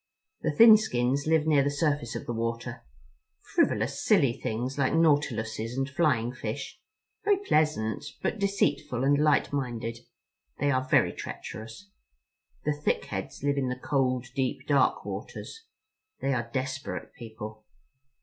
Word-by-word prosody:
The - - 0
Thin 225 -1 +8
Skins 140 - 0
live 160 -1 +3
near 150 -3 +4
the 140 - +1
surface 145 -4 -1
of - - -5
the 120 - -3
water, 115 0 -3 0.7
frivolous, - - +1
silly 130 -4 +4
things 120 +4 -3
like 130 -2 +2
nautiluses 120 -7 +1
and 135 0 0
flying 140 -6 +1
fish, 130 - -5 0.4
very 410 -1 +4
pleasant, 155 - +1 0.2
but 225 - -1
deceitful 150 -10 0
and 140 +1 +3
light 150 -1 +3
minded. 120 -4 -3 0.6
They 145 0 +1
are 130 0 0
very - - +4
treacherous. 110 -3 -8 0.7
The 150 - +2
Thick 150 0 -1
Heads 95 +6 -6
live 145 0 +1
in 130 -2 0
the 125 - -3
cold 130 -2 0
deep 130 -2 -1
dark 140 -2 +2
waters. 450 0 -7 0.5
They 135 - 0
are 120 -2 -2
desperate 130 +1 -4
people." 110 -4 -9
135 Hz, 140 wpm, -28 LUFS, 115-150 Hz, 0.7 s, Thin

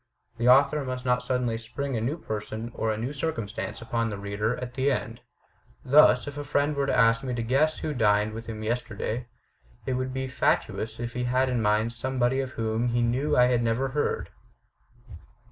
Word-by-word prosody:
The 120 +1 +3
author 140 +3 +5
must 130 0 -5
not 125 0 +2
suddenly 125 -3 -1
spring 130 +4 -4
a 110 - -1
new 135 +8 -1
person 110 -3 -5
or 110 - -1
a 110 - -2
new 120 +6 -3
circumstance 115 -6 -4
upon 115 0 -1
the 100 - -4
reader 100 +4 -2
at 125 -1 -6
the 135 +2 +1
end. 130 - -3 0.6
Thus, 135 -2 +6
if 145 0 -6
a - - -3
friend 145 +1 0
were 140 -1 0
to - - +1
ask 115 -1 +4
me 125 -2 -2
to 115 - -2
guess 140 +7 +2
who 155 - -3
dined 105 -3 +2
with 115 +1 -7
him 110 -1 -6
yesterday, 115 +1 -3 0.6
it 130 - -1
would 130 0 -2
be 130 0 -3
fatuous 115 -4 -1
if 120 -1 -4
he 125 0 -2
had 130 +1 +2
in 125 -2 0
mind 105 +2 +1
somebody 130 +1 0
of 130 -1 -3
whom 115 +1 -1
he 120 0 +1
knew 135 +6 +1
I 125 - +7
had 125 -1 +2
never 115 +3 0
heard." 145 +3 -1
125 Hz, 200 wpm, -27 LUFS, 115-130 Hz, 0.6 s, I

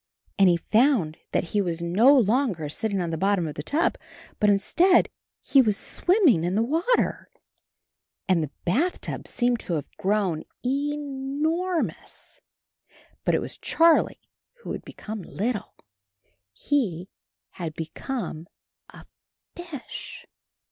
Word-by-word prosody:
And 195 -2 +7
he 175 - +4
found 215 - +2
that - - +1
he 205 - +3
was 170 -3 -2
no 210 +12 +5
longer 220 - +1
sitting 200 +5 -2
on 170 -1 -2
the 160 - -3
bottom 195 -2 +2
of 150 - -5
the 150 - -5
tub, 310 - 0 0.4
but 210 - +4
instead 335 - +4 0.3
he 275 - +5
was 210 -5 +1
so - - -6
CHARLIE 360 - +4
swimming 265 - +4
in 175 +2 0
the 220 - +3
water. 330 - 0 1.0
And 185 -4 +3
the 155 - -3 0.2
bathtub 290 - -1
seemed 240 -1 0
to 175 - -4
have 150 -4 -4
grown 190 -5 0 0.2
ENORMOUS. 290 +5 -2 0.8
But - - +2
it - - +1
was - - -6
Charlie 330 0 +2 0.4
who - - -5
had - - -5
become 215 -1 -7
little; 210 +5 -3 0.8
he 185 - -1 0.5
had 165 -3 -4
become 165 - -5 0.4
a - - -14 0.5
fish. 335 -7 -8
220 Hz, 135 wpm, -25 LUFS, 175-285 Hz, 1.0 s, And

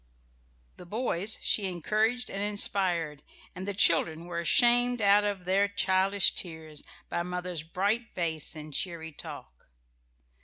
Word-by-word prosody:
The 180 - -12
boys 215 -1 -1
she 200 -3 +2
encouraged 215 +7 -1
and 195 - -4
inspired, 185 -7 +1 0.3
and 185 +2 -7
the 200 - -2
children 165 -2 +4
were 170 -1 -4
shamed 245 +4 +3
out 205 0 +4
of 200 -3 -3
their 195 +2 +2
childish 195 0 +2
tears 160 -4 -6 0.2
by 170 - -2
mother's 180 -1 -4
bright 200 +8 -2
face 160 -4 -2
and 155 -1 -9
cheery 165 0 -3
talk. 65 - -10
185 Hz, 130 wpm, -28 LUFS, 170-205 Hz, 0.3 s, children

